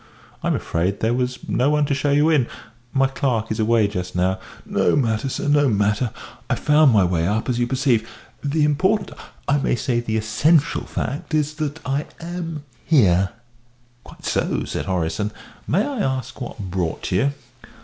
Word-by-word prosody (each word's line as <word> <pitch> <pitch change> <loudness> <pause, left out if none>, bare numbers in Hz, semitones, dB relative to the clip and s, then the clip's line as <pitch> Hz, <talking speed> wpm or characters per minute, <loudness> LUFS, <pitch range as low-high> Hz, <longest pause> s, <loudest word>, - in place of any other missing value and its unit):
"I'm - - +1
afraid 90 +4 -1
there 115 +2 +2
was 125 0 -1
no 130 +3 +2
one 150 0 +3
to 140 - 0
show 140 +1 0
you 145 +2 +4
in 135 -7 +3 0.4
my 135 0 +3
clerk 130 -5 -1
is 110 - -2
away 110 -1 +3
just 90 -3 -5
now." 95 +1 +1 0.3
"No - - +2
matter, 120 -2 +1
sir, - - -3
no 145 -1 +4
matter. 105 +3 +1 0.4
I - - +2
found 150 -2 +4
my 105 -4 +5
way 85 -2 +1
up, 110 +3 0
as 125 -2 0
you 120 - +1
perceive. 125 -4 +1 0.3
The 150 +2 +1
important, 190 +8 +2 0.4
I 145 +1 +3
may 135 - +1
say 120 0 0
the 110 -2 -1
essential, 140 +9 +2
fact 145 +3 -3
is 150 0 +1
that 150 +1 -2
I 140 +3 -1
am 165 -3 -5 0.2
here." 95 - +4 0.7
"Quite - - -14
so," - - 0
said - - -3
Horace, 90 -1 -1
"and 105 0 0 0.4
may 195 +7 +2
I 280 -4 -3
ask 130 - -2
what 120 - -6
brought 90 -5 -3
you?" 120 +10 +2
125 Hz, 180 wpm, -22 LUFS, 105-145 Hz, 0.7 s, my